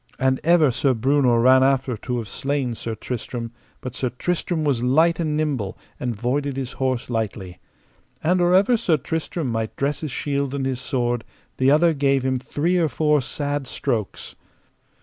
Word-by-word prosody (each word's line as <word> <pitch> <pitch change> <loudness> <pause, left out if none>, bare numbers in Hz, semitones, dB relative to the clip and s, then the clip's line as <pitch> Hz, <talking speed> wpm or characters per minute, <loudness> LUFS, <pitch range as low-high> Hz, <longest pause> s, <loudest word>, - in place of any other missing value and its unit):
And 130 0 +1
ever 165 -4 +5
Sir 130 +2 +1
Breunor 125 -1 +3
ran 130 +1 +6
after 135 -2 +2
to 125 +3 -4
have 115 -3 -4
slain 135 +1 -2
Sir 115 0 -5
Tristram, 115 0 -5 0.3
but 130 - -6
Sir 130 -1 -2
Tristram 165 +5 -2
was 140 -6 +1
light 160 +8 +3
and 155 -3 0
nimble, 135 -11 -2 0.2
and 125 -2 -2
voided 135 +5 -1
his 135 -1 -3
horse 130 -3 -2
lightly. 105 -6 -4 0.6
And 180 +3 +2
or 175 +1 +4
ever 205 +6 +4
Sir 180 -8 +2
Tristram 160 -1 -3
might 115 -1 -3
dress 140 +1 -1
his 155 - -3
shield 140 0 -2
and 135 -1 -2
his 130 -1 -2
sword 120 -3 -1 0.3
the 130 +1 +3
other 160 +3 +5
gave 140 -2 +1
him 130 -1 +1
three 155 +7 0
or 165 -2 +2
four 150 0 +2
sad 145 +1 -3
strokes. 115 -8 -3
135 Hz, 175 wpm, -23 LUFS, 125-150 Hz, 0.6 s, ran